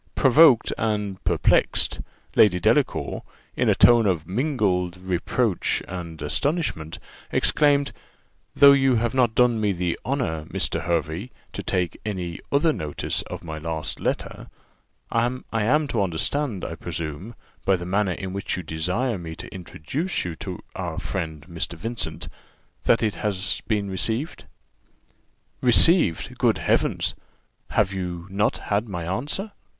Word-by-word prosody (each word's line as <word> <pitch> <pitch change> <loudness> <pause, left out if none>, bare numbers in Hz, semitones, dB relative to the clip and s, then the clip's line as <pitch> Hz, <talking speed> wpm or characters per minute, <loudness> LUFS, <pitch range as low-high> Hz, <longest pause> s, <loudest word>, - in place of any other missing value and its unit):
Provoked 135 -2 +6
and 105 -3 -2
perplexed, - - +2 0.4
Lady 90 -5 +5
Delacour, - - +1 0.3
in - - +2
a - - +4
tone 120 -3 +6
of 85 -5 0
mingled 95 - 0
reproach 95 +4 0
and 85 -3 -7
astonishment, 80 - -1 0.3
exclaimed, 145 -1 +3 0.6
"Though 140 0 +9
you 135 -2 +4
have 120 +1 0
not 120 -4 +2
done 120 -3 +3
me 105 -2 +2
the 90 -1 -2
honour, 90 - -2
Mr. - - -1
Hervey, 85 +5 -1 0.2
to - - -4
take 90 -2 -1
any 90 -5 -4
other 150 +3 +3
notice 75 - -3
of - - -7
my 80 -2 -6
last 80 0 -3
letter, - - -3 0.6
I 115 +1 +2 0.2
am 125 +8 +2
to 115 - 0
understand, 100 - -1
I - - -4
presume, 85 +5 -5 0.3
by 95 - +3
the 90 -1 -5
manner 95 +1 +1
in 95 +1 -6
which 100 -1 -3
you 90 - -5
desire 90 +9 -1
me 80 -2 -7
to - - -9
introduce 100 - -3
you 90 - -3
to - - -7
our - - -4
friend 80 -2 -4
Mr. 85 -1 -4
Vincent, 85 -6 -5 0.6
that 115 - +4
it 105 -2 +1
has 100 -1 -1
been 105 -3 0
received." 110 - -2 1.2
"Received! 125 - +4
Good - - +3
Heavens! - - +1 0.6
have 100 -2 +1
not 95 +2 -1
you - - -13
had 105 +2 -1
my 85 -4 -4
answer?" 145 - -2
100 Hz, 140 wpm, -24 LUFS, 85-120 Hz, 1.2 s, Though